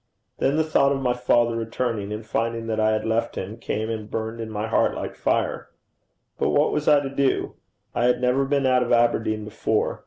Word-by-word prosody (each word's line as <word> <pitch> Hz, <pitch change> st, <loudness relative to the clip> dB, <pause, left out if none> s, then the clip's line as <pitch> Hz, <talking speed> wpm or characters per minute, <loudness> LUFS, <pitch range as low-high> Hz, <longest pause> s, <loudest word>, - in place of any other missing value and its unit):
Then 135 Hz, +2 st, +2 dB
the 160 Hz, -, +3 dB
thought 155 Hz, -3 st, +3 dB
of 140 Hz, -, 0 dB
my 125 Hz, -2 st, +1 dB
father 120 Hz, -1 st, +2 dB
returning 115 Hz, -2 st, -2 dB
and 105 Hz, +1 st, -5 dB
finding 115 Hz, +1 st, -2 dB
that 110 Hz, -1 st, -2 dB
I 110 Hz, 0 st, +3 dB
had 110 Hz, 0 st, 0 dB
left 115 Hz, +1 st, 0 dB
him, 100 Hz, +4 st, -5 dB
came 110 Hz, -1 st, -3 dB
and 110 Hz, -1 st, -5 dB
burned 110 Hz, +1 st, -4 dB
in 110 Hz, -, -5 dB
my 105 Hz, 0 st, -3 dB
heart 110 Hz, -, +1 dB
like -, -, -5 dB
fire. -, -, -1 dB, 0.7 s
But -, -, +1 dB
what 145 Hz, +1 st, +3 dB
was 150 Hz, 0 st, -2 dB
I 150 Hz, -2 st, +6 dB
to 135 Hz, -, -4 dB
do? 140 Hz, -1 st, 0 dB, 0.4 s
I 120 Hz, -, +1 dB
had 125 Hz, 0 st, +3 dB
never 125 Hz, +2 st, +2 dB
been 140 Hz, 0 st, +1 dB
out 130 Hz, -1 st, +4 dB
of 120 Hz, -, -1 dB
Aberdeen 115 Hz, -2 st, +2 dB
before. 110 Hz, 0 st, -1 dB
115 Hz, 215 wpm, -24 LUFS, 110-130 Hz, 0.7 s, I